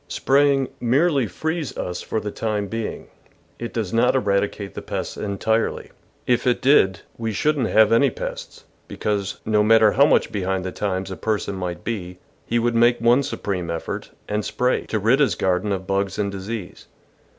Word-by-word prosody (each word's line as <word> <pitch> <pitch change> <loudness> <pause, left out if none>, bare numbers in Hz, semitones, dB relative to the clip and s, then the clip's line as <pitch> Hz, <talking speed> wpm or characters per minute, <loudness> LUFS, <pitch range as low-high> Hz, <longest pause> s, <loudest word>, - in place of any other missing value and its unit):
Spraying 140 -1 +2
merely 135 +1 +2
frees 160 - -3
us 90 0 -4
for 110 - -2
the 105 0 -5
time 105 -2 -2
being; 110 +2 -5 0.5
it 120 - -5
does 110 -6 -3
not 125 +3 +3
eradicate 100 -3 0
the - - -6
pests - - -4
entirely. 110 +2 -1 0.3
If 125 0 +1
it 125 - +2
did, 135 - +3
we - - +5
THE - - -3
VEGETABLE 95 - -16
GARDEN 115 -1 -2
shouldn't 140 0 0
have 110 -1 +6
any 115 - +5
pests, - - -7 0.2
because, 100 -2 -2
no 105 -1 +3
matter 110 0 +5
how 140 +2 +5
much - - +2
behind 95 -2 -2
the 95 - -3
times 95 -1 -3
a - - -4
person 105 -2 -2
might 90 -2 -5
be, 90 -6 -4 0.3
he 120 - +1
would 120 0 +1
make 120 +1 +4
one 120 +3 +4
supreme 95 -9 -3
effort, 85 -1 -4 0.2
and 105 +1 -1
s]3ray, 125 +4 0
to 110 - -1
rid 115 +6 +3
his 145 - +3
garden 95 +2 0
of 95 -1 -2
bugs 100 0 -1
and 100 -1 -1
disease. 100 0 -7
110 Hz, 185 wpm, -22 LUFS, 100-125 Hz, 0.5 s, have